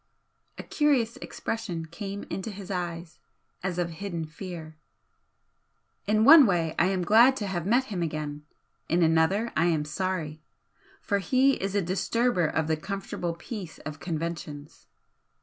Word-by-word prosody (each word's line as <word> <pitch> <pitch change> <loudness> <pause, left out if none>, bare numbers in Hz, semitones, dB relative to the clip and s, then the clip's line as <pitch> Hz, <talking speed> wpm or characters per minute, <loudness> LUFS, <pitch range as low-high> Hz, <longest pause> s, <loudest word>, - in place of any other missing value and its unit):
A - - -6
curious 265 -5 +1
expression 215 -10 -4
came 195 +5 -6
into 195 +3 -5
his 200 -1 -8
eyes, 175 -2 -4 0.4
as 185 -2 -3
of 175 -1 -1
hidden 170 -1 -4
fear. 160 -1 -8 1.3
"In 215 +1 +3
one 295 -2 +10
way 165 -4 +1
I 170 - +4
am 190 -1 0
glad 235 +8 +6
to 210 - -3
have 180 -3 -3
met 245 +5 +4
him 180 - -2
again 150 -2 -3 0.5
in 170 +2 +3
another 165 +8 +2
I 160 - +3
am 160 -3 +1
sorry. 155 -1 -3 0.6
For 200 -1 0
he 260 +7 +3
is 195 +1 -2
a 200 - +2
disturber 190 +1 +1
of 160 +1 0
the 160 0 0
comfortable 180 -1 -4
peace 180 -1 -7
of 155 0 -6
conventions. 160 -3 -5
180 Hz, 150 wpm, -27 LUFS, 160-205 Hz, 1.3 s, one